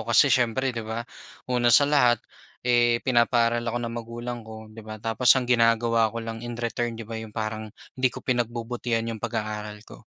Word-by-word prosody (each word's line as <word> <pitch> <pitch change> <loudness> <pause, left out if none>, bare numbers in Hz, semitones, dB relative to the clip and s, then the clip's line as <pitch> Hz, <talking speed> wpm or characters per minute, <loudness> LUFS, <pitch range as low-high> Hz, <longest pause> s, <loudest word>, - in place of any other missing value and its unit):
kasi 145 - +6
siyempre 125 +1 +1
'di 115 - -3
ba 115 +2 -4 0.4
una 120 -1 +2
sa 145 +5 +6
lahat, 125 -5 +4 0.5
eh, 120 -1 +4
pinapaaral 120 -2 +2
ako 120 +1 -2
ng 115 -1 -4
magulang 120 +1 -5
ko 110 0 -10
'di 110 +1 -12
ba? 110 0 -8
Tapos 115 +3 +4
ang 125 -2 0
ginagawa 115 -1 +3
ko 115 - -4
lang 115 0 -6
in 120 - -5
return 120 0 -2
'di 115 -1 -8
ba, 115 - -5
'yong 110 -1 -8
parang 110 -1 -4 0.2
hindi 130 0 +3
ko - - -7
pinagbubutihan 120 -1 -2
yung 110 -2 -6
pag-aaral 105 -2 -4
ko. - - -13
115 Hz, 190 wpm, -25 LUFS, 110-120 Hz, 0.5 s, kasi